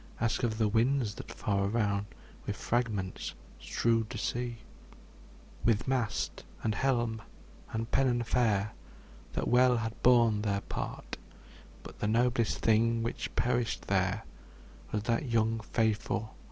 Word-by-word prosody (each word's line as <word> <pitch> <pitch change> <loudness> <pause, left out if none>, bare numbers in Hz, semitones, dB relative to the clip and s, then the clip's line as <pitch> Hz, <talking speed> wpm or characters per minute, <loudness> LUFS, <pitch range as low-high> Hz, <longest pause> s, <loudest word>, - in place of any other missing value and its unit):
Ask 115 -1 +1
of 110 -3 0
the 110 -1 +3
winds, 115 +1 +2
that - - -9
far 100 -1 0
around 100 -2 0 0.4
With 105 - -1
fragments 105 -4 -2 0.2
strewed 115 -2 +1
the 120 - -5
sea; 120 +2 -2 1.1
With 110 -3 +2
shroud, 120 -5 -1 0.2
and 110 -1 0
mast, 120 -3 0 0.5
and 115 +1 -3
pennon 125 -3 +2
fair, 110 -4 +1 0.6
That - - -1
well 125 0 +5
had 115 -1 -4
borne 115 -4 +5
their 100 -2 0
part, - - -5 0.7
But - - -11
the - - 0
noblest 115 +1 +2
thing 115 +1 +3
that 115 - -4
perished 120 -2 0
there 95 +2 +1 0.7
Was 105 -1 -1
that 120 +4 0
young, 115 0 +2
faith 110 0 0
115 Hz, 130 wpm, -31 LUFS, 105-120 Hz, 1.1 s, well